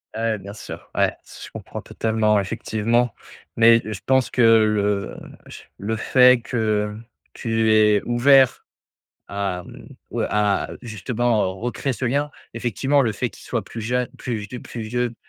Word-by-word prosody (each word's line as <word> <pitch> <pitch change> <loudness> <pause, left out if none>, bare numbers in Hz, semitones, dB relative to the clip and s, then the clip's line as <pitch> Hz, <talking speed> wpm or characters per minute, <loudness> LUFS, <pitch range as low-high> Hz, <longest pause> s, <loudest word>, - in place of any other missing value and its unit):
Ouais, 110 - -3
ouais, 115 -1 0
bien 100 +2 -9
sûr! 105 - -10
Ouais, - - +3
s - - -12
je - - -13
comprends - - -8
totalement. 110 -2 +1
Effectivement. 110 +4 0 0.4
Mais, 115 0 +6
je 110 -3 -5
pense 130 -3 +2
que 125 - +1
le 105 -3 +3 0.3
j - - -10 0.2
le 110 +3 -3
fait 125 +2 +5
que 110 -3 0
hem, 115 - -11 0.3
tu 115 -1 0
es 105 -1 +4
ouvert 130 +2 +4 0.6
à, 100 -3 -3
mmh - - -13 0.2
ou - - -3
à 105 -1 +1
justement 110 -2 -1
recréer 125 +3 -2
ce 130 - -4
lien, 145 +4 0 0.2
effectivement 125 +5 +1
le 115 -5 +1
fait 120 +3 -2
qu'ils - - -15
soient 115 -5 -3
plus 115 - -8
jeunes 125 +3 -1
plus 120 -3 -3
vie 105 +4 -7
plus 115 - -7
vieux, 120 +1 -2
115 Hz, 165 wpm, -22 LUFS, 105-120 Hz, 0.6 s, Mais